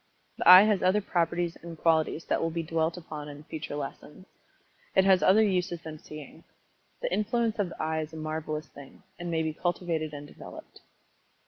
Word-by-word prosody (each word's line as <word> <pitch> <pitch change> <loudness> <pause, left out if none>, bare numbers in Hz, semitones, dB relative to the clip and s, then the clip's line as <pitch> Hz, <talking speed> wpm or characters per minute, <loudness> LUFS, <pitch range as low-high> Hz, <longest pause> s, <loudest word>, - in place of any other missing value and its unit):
The - - +4
eye 185 +2 +12
has 210 -3 +2
other 185 +3 +3
properties 175 -3 -1
and 170 -1 -10
qualities 160 0 +1
that - - 0
will 165 - 0
be 165 0 -3
dwelt 165 +1 -1
upon 150 -3 -7
in 145 +1 -10
future 155 -1 -6
lessons. 150 +4 -7 0.7
It 190 -1 +5
has 190 -2 +5
other 210 +4 +5
uses 180 -4 -1
than 155 -1 -8
seeing. 150 +2 -11 0.6
The - - -1
influence 225 +1 0
of 195 -3 0
the - - -11
eye 160 0 -1
is 155 0 -6
a 160 - -9
marvelous 155 0 -4
thing, 140 -1 -14 0.2
and 175 0 -5
may 160 -1 0
be 160 -1 -2
cultivated 170 -2 -2
and 145 0 -8
developed. - - -12
165 Hz, 190 wpm, -28 LUFS, 155-185 Hz, 0.7 s, eye